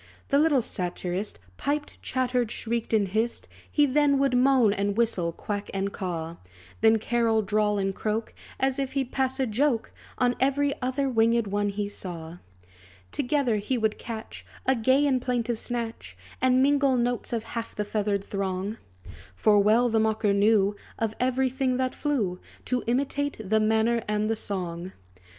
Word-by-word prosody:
The 280 - +4
little 295 -5 +3
satirist 180 - -3 0.2
Piped, 295 +1 -3
chattered, 250 -2 0
shrieked, 230 0 -3
and 210 -3 +3
hissed; 220 +4 -1 0.2
He 295 - +4
then 285 0 +3
would 270 -2 +2
moan, 250 -4 +4
and 200 0 -1
whistle, 195 -8 +1
quack, 205 +4 -5
and 195 +1 -1
caw; 170 -3 -4 0.4
Then, 225 0 +6
carol, 225 0 +1
drawl, 210 +1 +1
and 195 -1 0
croak, 220 +3 -2 0.3
As 265 +1 +1
if 270 -1 -2
he'd 270 -2 -1
pass 265 0 0
a 265 - +2
joke 235 +1 0 0.3
On 245 -1 +2
every 280 +2 +2
other 260 +2 0
winged 230 -2 +3
one 205 +1 0
he 200 0 -2
saw. 175 -4 -7 0.7
Together 260 -4 +1
he 225 +5 -1
would 220 -2 0
catch 225 -2 -7 0.2
A 265 - +4
gay 260 +5 +3
and 260 -3 +2
plaintive 240 -2 -1
snatch, 225 - -4 0.2
And 260 0 +4
mingle 280 -2 +3
notes 245 -1 -1
of 230 -2 -1
half 230 0 -6
the 210 - -2
feathered 205 -1 -1
throng. 195 +2 -3 0.6
For 210 - +4
well 220 +4 +4
the 225 -1 +2
mocker 220 -1 +2
knew, 205 0 +3 0.2
Of 225 -1 -1
every 255 +1 +1
thing 260 -1 0
that 255 0 0
flew, 220 -12 -1 0.3
To 250 -1 -1
imitate 280 +3 0
the 220 +2 +3
manner 220 +2 +2
and 210 +1 0
the - - +1
song. 180 -3 -4
225 Hz, 165 wpm, -26 LUFS, 205-260 Hz, 0.7 s, Then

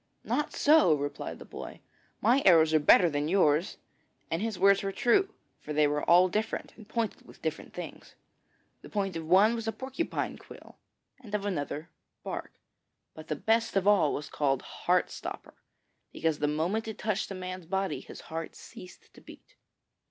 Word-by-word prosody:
'Not 295 - -1
so,' 290 - +5
replied 145 0 -5
the - - -11
boy. - - -9 0.4
'My 245 +6 +4
arrows 160 -3 +6
are 155 - +5
better 165 +4 +6
than 145 -1 -1
yours.' 165 -2 +2 0.5
And 165 +2 -1
his 220 -3 -2
words 200 +1 +5
were 195 - -2
true, 385 - +2 0.2
for 150 - -6
they 150 0 +4
were 145 0 0
all 180 +2 +6
different, 215 +4 -3
and 220 -2 -15
pointed 230 -2 -3
with - - -17
different - - -4
things. - - -9 0.7
The - - -12
point 195 -3 -2
of 165 -1 -5
one 195 +6 +5
was 230 -1 -4
a - - +1
porcupine 265 +8 -4
quill, - - -14 0.4
and 215 -5 -6
of 205 -1 -2
another 160 -3 -3 0.3
bark, - - -5 0.6
but 155 0 -11
the 155 - -2
best 225 +9 +1
of 195 0 +2
all 200 -8 +5
was 145 0 -4
called 135 -3 0
Heart - - 0
stopper, - - -7 0.6
because 160 -2 -1
the 150 - +1
moment 175 +10 -1
it 220 -1 -5
touched 215 -1 -2
a 195 - -5
man's 185 -2 -6
body 190 +2 -1
his - - -11
heart 165 0 -6
ceased 180 - -13
to - - -16
beat. - - -15
185 Hz, 180 wpm, -29 LUFS, 155-220 Hz, 0.7 s, arrows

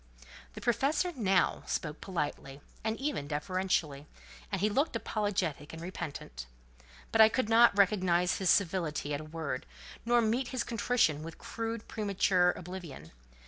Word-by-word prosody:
The - - -9
professor 285 - +1
now 195 -7 +2
spoke 150 -1 -3
politely, 145 -6 -4 0.2
and 220 0 -1
even 270 - -2
deferentially, 150 -2 -1 0.4
and 195 - -1
he 205 - +2
looked 265 +6 0
apologetic 190 -10 -2
and 160 - -7
repentant; 145 - -6 0.6
but 225 - +5
I 220 - +9
could 225 -1 -1
not 230 -2 +6
recognise 185 -3 +3
his 190 -2 +1
civility 165 -6 +1
at 145 - -2
a - - -9
word, 155 -4 -4 0.4
nor 240 +1 +3
meet 235 +4 +1
his 255 -1 -2
contrition 225 -10 +1
with 165 +1 -8
crude, 230 -1 -5
premature 195 -3 +2
oblivion. 175 - -9
190 Hz, 145 wpm, -31 LUFS, 160-225 Hz, 0.6 s, I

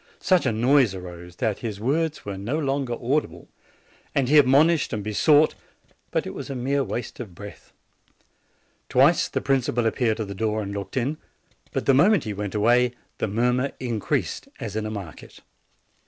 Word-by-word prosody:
Such 185 -7 +2
a - - +2
noise 120 -1 +3
arose, 90 -1 -9
that 105 +2 -1
his 110 -4 -5
words 150 +7 -1
were 100 -1 -4
no 105 +10 -3
longer 135 -5 -1
audible, 135 +5 -2 0.7
and 130 -2 +1
he 150 +1 +7
admonished 145 +4 +4
and 105 -2 -3
besought; 145 +9 +4 0.6
but - - -1
it - - -6
was - - -7
a 135 - -4
mere 135 +3 0
waste 120 -1 -5
of 105 -8 -8
breath. 100 +3 -11 1.2
Twice - - +4
the - - -2
principal 125 -3 +1
appeared 115 0 +1
at 110 - -3
the 100 - -5
door 110 +1 -1
and 100 0 -5
looked 100 +5 -5
in; 140 +5 -1 0.5
but - - -2
the 135 - +5
moment 185 +10 +4
he 110 -3 -4
went 105 +1 -5
away 120 +3 +3 0.3
the - - 0
mur 120 +4 +1
mur 130 +2 -1
increased 115 -5 -2
as 105 -3 -5
in 110 0 -2
a - - -4
market. 100 -7 -9
120 Hz, 180 wpm, -24 LUFS, 105-140 Hz, 1.2 s, he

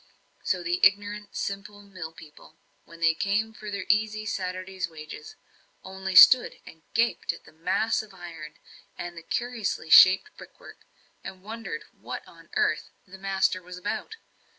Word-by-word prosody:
So 180 -1 -1
the 175 +1 -1
ignorant, 205 +1 +2
simple 200 +1 -5
mill 185 -5 -8
people, 155 -1 -16 0.3
when 170 0 -15
they 165 0 +4
came 210 +5 -1
for 215 -1 -9
their 200 -2 -4
easy 215 +1 +1
Saturday's 185 -2 -4
wages, 155 -1 -10 0.5
only 190 0 -5
stood 250 +7 +8
and 160 - -14
gaped 230 +1 +1
at - - -13
the - - -17
mass 185 +7 0
of 215 -1 -14
iron, 165 -4 -10 0.4
and 175 0 -6
the 165 - -8
curiously 225 -6 -3
shaped 190 - +7
brickwork, - - -14 0.4
and 190 -1 -9
wondered 230 - -6
what - - -8
on - - -17
earth 430 0 +1 0.2
"the 190 +1 -13
master" 190 -1 0
was 180 0 -10
about? 210 - -4
190 Hz, 150 wpm, -27 LUFS, 175-210 Hz, 0.5 s, stood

